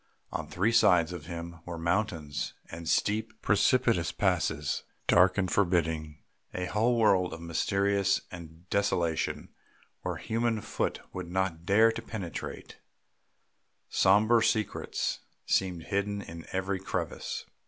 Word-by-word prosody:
On - - -4
three 100 +6 +1
sides 90 -7 +4
of 80 -3 -8
him 85 -1 -6
were 85 -1 -6
mountains 80 - -1 0.2
and 80 0 -6
steep, 110 +1 0
precipitous 100 -2 +3
passes, 80 -7 0 0.2
dark 90 +2 +5
and 95 -2 0
forbidding, 80 -5 +1 0.4
a 90 - -1
whole 115 +6 +1
world 95 -5 +3
of - - -7
mystery 100 +4 +1 0.3
and 85 0 -11
desolation, 85 -5 0 0.5
where - - -3
human 115 0 -1
foot - - -2
would 90 -2 -5
not 90 -2 -2
dare 110 +3 +6
to 115 - -5
penetrate; 100 -7 -6 1.1
sombre 110 +4 +4
secrets 110 -2 -1 0.3
seemed 90 -3 0
hidden 100 +1 -2
in 85 0 -9
every 95 +1 -1
crevice. 95 - -4
95 Hz, 120 wpm, -29 LUFS, 85-105 Hz, 1.1 s, dare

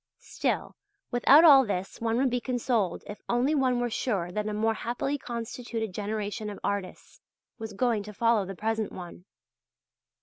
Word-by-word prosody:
Still - - -3 0.4
without 270 +5 +6
all 280 -5 +9
this 195 -3 -4
one 230 0 0
would 260 0 +2
be 245 0 0
consoled 235 -7 -1
if 205 - -9
only 245 +5 +2
one 260 -4 +2
were 240 -1 -1
sure 195 -8 -1
that 210 +3 -2
a - - -2
more 220 +2 +1
happily 245 +5 -2
constituted 235 -3 -5
generation 210 +1 -3
of 205 - -8
artists 200 -2 -4 0.4
was 220 -1 -6
going 230 0 +1
to 210 - -9
follow 230 -2 +3
the 195 +1 -7
present 220 +1 -2
one. 175 0 -10
225 Hz, 165 wpm, -28 LUFS, 205-245 Hz, 0.4 s, all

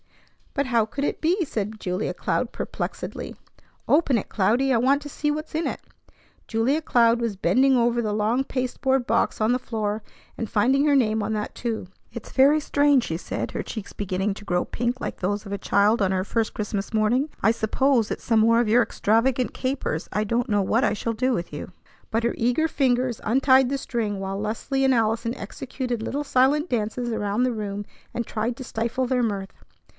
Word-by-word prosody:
"But 280 -1 +1
how 235 -4 +2
could 275 +6 -5
it - - -2
be?" 350 +3 +2
said 215 -4 -4
Julia 185 +2 -2
Cloud - - -1
perplexedly. - - -5 0.5
"Open 290 -4 +3
it, 205 - -4
Cloudy. 240 +7 +2
I - - +4
want 270 +5 +3
to 290 - -7
see 295 +1 -2
what's 305 +1 -3
in 320 +1 0
it." - - -3 0.7
Julia 240 +8 +1
Cloud 235 -5 +3
was 225 -4 -2
bending 260 +6 +3
over 240 0 +2
the 215 -2 -1
long 215 +5 +1
pasteboard 260 0 -1
box 230 +1 +1
on 220 +2 +3
the 250 - +1
floor 215 -3 -3 0.4
and 225 - -4
finding 260 +7 +3
her 290 -1 +4
name 220 -4 +2
on 220 - -2
that, 210 -1 -3
too. 230 -5 -3 0.3
"It's 235 - -9
very 280 +3 +5
strange," 285 -3 +3
she 165 - -3
said, 165 - -4
her - - -3
cheeks 215 -4 -7
beginning 195 0 -1
to 205 - -11
grow 180 -3 0
pink 240 +2 -2
like - - -4
those 205 +3 -2
of 200 - -6
a - - -1
child 205 +3 +2
on 190 -1 +2
her 185 -1 0
first 225 +1 -1
Christmas 205 -1 -3
morning. 235 +7 +2
"I 220 - +4
suppose 230 +1 +1
it's - - -4
some 225 -1 +3
more 230 +1 +5
of 240 - +2
your 235 +3 +5
extravagant 235 +4 +1
capers. 255 - -2
I 210 +2 0
don't 240 +4 0
know 205 -2 +2
what 225 +6 +2
I - - +2
shall 230 +2 -2
do 255 +4 0
with 170 -9 -3
you!" 145 - -6 0.4
But 225 +1 0
her 235 - 0
eager 250 +7 +2
fingers 255 -5 0
untied 260 +2 +4
the 275 - 0
string, 220 -6 -2
while 195 0 -3
Leslie 230 +6 -1
and 265 -1 +4
Allison 230 +1 0
executed 245 +2 -5
little 280 +6 -2
silent 285 +5 +2
dances 240 +1 -1
around 210 +1 0
the 255 -1 +1
room 205 -2 -4 0.3
and 235 - -2
tried 230 +2 -2
to - - -6
stifle 235 +3 -1
their 250 -1 +1
mirth. 200 -3 -2
235 Hz, 200 wpm, -24 LUFS, 215-260 Hz, 0.7 s, very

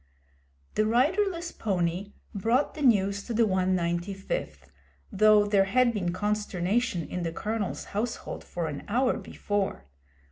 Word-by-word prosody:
The 215 - +2
riderless 340 - +1
pony 185 -1 -2 0.2
brought 230 +7 +1
the 305 - -8
news 200 -6 +3
to 235 - -4
the 230 - +4
195th, 180 - -1 0.4
though 215 0 +5
there 200 -1 +3
had 240 +4 +3
been 180 -5 -1
consternation 205 -1 -1
in 180 - -4
the 165 -1 -2
Colonel's 210 +3 -3
household 220 +4 -3
for 175 -1 -4
an 145 -2 -5
hour 250 +5 +2
before. 200 - -3
205 Hz, 130 wpm, -28 LUFS, 180-230 Hz, 0.4 s, though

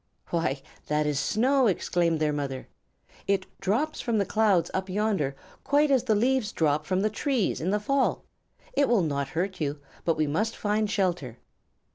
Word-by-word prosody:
"Why, 145 -5 -1 0.2
that 150 0 +1
is 150 -2 0
snow!" 255 - +2
exclaimed 170 -4 +1
their 150 -1 +1
mother. 135 -3 -4 0.6
"It 195 -1 +1
drops 270 +11 0
from 235 -2 0
the 200 - +2
clouds 200 -6 +2
up 190 0 -2
yonder 195 -9 0 0.3
quite 290 +1 +3
as 260 -2 +3
the 220 -4 +3
leaves 245 0 +1
drop 155 -1 0
from 185 0 +1
the 215 - +2
trees 250 - 0
in 170 - -1
the 210 +2 +1
fall. 275 +6 0 0.5
It 285 - +2
will 230 -6 +3
not 140 -3 -1
hurt 185 0 -2
you, 145 0 -2 0.2
but 165 -2 +1
we 155 - +2
must 210 +10 -1
find 210 0 0
shelter." 175 - -1
190 Hz, 175 wpm, -27 LUFS, 155-220 Hz, 0.6 s, quite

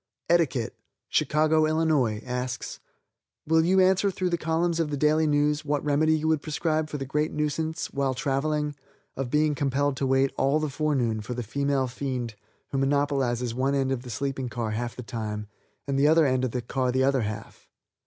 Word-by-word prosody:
Etiquette, 150 -9 +2 0.4
Chicago, 155 +1 +3
Ill., 155 -4 +2 0.2
asks: 125 0 -4 0.7
"Will 160 +1 +4
you 185 +3 +3
answer 190 +2 +4
through 185 -1 -2
the - - +3
columns 165 +1 0
of 160 -2 0
the 145 - -2
Daily 155 +2 +3
News 150 0 +2
what 145 -1 -1
remedy 155 +2 +3
you 155 +1 -2
would 160 -2 +2
prescribe 155 0 -1
for 150 - -4
the 135 - -4
great 150 +3 -1
nuisance 155 +2 -2
while 135 -2 0
traveling 150 +1 -1 0.4
of 135 -2 -3
being 150 +2 +2
compelled 140 0 0
to 135 - 0
wait 135 +1 +2
all 140 +3 +3
the 155 -2 -2
forenoon 135 -7 0
for 120 +4 -5
the 120 - -3
female 140 +3 0
fiend 125 -2 -4 0.4
who 135 - 0
monopolizes 135 -4 +1
one 135 +3 0
end 135 -1 +1
of 130 -2 -1
the 125 - -10
sleeping 135 +1 -3
car 115 -3 -3
half 120 +2 -3
of - - -22
the 125 - -7
time 110 -3 -4 0.4
and 135 -1 0
the 145 - +5
other 160 0 +5
end 130 -1 +1
of 130 - +1
the 125 +1 -3
car 130 +1 -1
the 130 +1 +2
other 135 -1 +2
half. 110 0 -6
140 Hz, 195 wpm, -26 LUFS, 130-155 Hz, 0.7 s, the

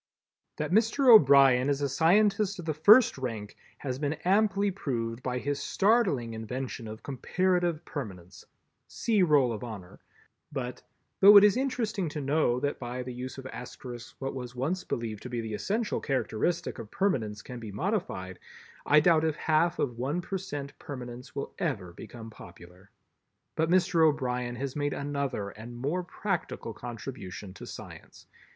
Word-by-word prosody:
That 155 +1 -3
Mr. 225 +6 +3
O'Brien 135 - +7
is 140 -1 +1
a - - +2
scientist 200 +7 +3
of 175 - -7
the 155 - -1
first 205 - +6
rank 110 -5 -5 0.2
has 130 -2 -4
been 145 0 0
amply 200 +1 +3
proved 120 -9 -3
by 125 -1 -2
his 140 +2 -2
startling 190 - +2
invention 120 +1 -5
of 110 +1 -9
comparative 175 +4 0
Permanence—see 100 - -4
Roll 145 -8 +4
of 105 - -6
Honor—but, 125 - -9 0.4
though 205 +1 +10
it 200 - +9
is 210 0 +6
interesting 225 - -1
to 150 - -5
know 140 -3 +1
that 145 - -1
by 125 0 -4
the 125 0 -6
use 125 +2 -6
of 135 - -8
Asterisks 125 -2 -8
what 135 0 -4
was 125 -2 -7
once 160 +9 -1
believed 110 -3 -4
to 125 - -7
be 120 -1 -3
the 110 -1 -4
essential 210 - -1
characteristic 135 +3 -1
of 110 -2 -8
Permanence 110 - -1
can 125 -1 -8
be 110 -3 -7
modified, 105 - -3 0.5
I 150 +1 +6
doubt 160 -1 +4
if 160 -2 +1
half 160 +3 +1
of 120 -3 -2
one 140 +7 -1
per 190 +2 -4
cent 145 -7 -6
Permanence 125 -3 -8
will 140 - -4
ever 105 - -2
become 115 +5 -10
popular. 90 0 -14 0.7
But 160 0 +1
Mr. 180 -2 +3
O'Brien 125 -5 +1
has 135 +1 -4
made 145 -1 -1
another 140 -7 -3
and 115 +4 -10
more 145 +9 -1
practical 175 - -4
contribution 105 -5 -7
to - - -10
science. - - -11
135 Hz, 160 wpm, -29 LUFS, 120-175 Hz, 0.7 s, though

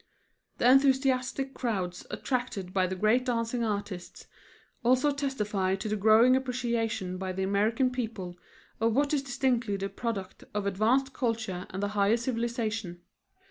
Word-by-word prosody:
The - - +3
enthusiastic 265 0 +3
crowds 190 -9 -3
attracted 245 -8 -3
by 185 -1 +2
the 185 - -3
great 215 +6 +3
dancing 235 -1 -1
artists 205 -4 -4 0.6
also 255 +4 +4
testify 210 -9 -1
to 195 - -5
the 215 - 0
growing 220 +5 +6
appreciation 235 -7 -1
by 190 -1 -3
the 190 +1 -2
American 215 +6 +2
people 220 -8 -4 0.4
of 225 0 +2
what 285 +1 +2
is 290 - +2
distinctively 245 -5 0
the 195 0 -3
product 200 -2 -5
of 205 -1 -1
advanced 230 +8 +2
culture 220 -7 -2
and 190 +2 -4
the 205 - 0
higher 205 +2 +2
civilization. 230 -6 -3
225 Hz, 140 wpm, -29 LUFS, 195-255 Hz, 0.6 s, growing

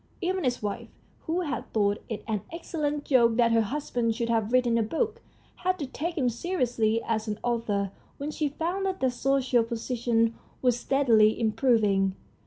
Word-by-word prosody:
Even 370 -2 -1
his 245 -3 -1
wife, 205 -1 -4 0.4
who 335 +3 0
had 300 -5 -4
thought 205 -1 +1
it 220 - -4
an 215 -3 -1
excellent 300 -3 -3
joke 235 -4 +4
that 235 -1 +4
her 230 0 +4
husband 235 -1 -1
should 235 0 -2
have 225 -1 +1
written 250 -2 +3
a - - +3
book, 425 - -1 0.4
had 370 0 0
to 295 - -3
take 330 +6 -4
him 260 -4 +2
seriously 235 -5 0
as 225 -1 -1
an 210 -1 -2
author 210 -5 0 0.3
when 290 +2 -4
she 300 -1 -1
found 345 +7 -2
that 380 0 -2
their 260 -1 +2
social 255 -1 +2
position 230 0 0 0.3
was 245 -2 +2
steadily 230 -6 +3
improving. 215 -4 +2
240 Hz, 175 wpm, -27 LUFS, 225-290 Hz, 0.4 s, joke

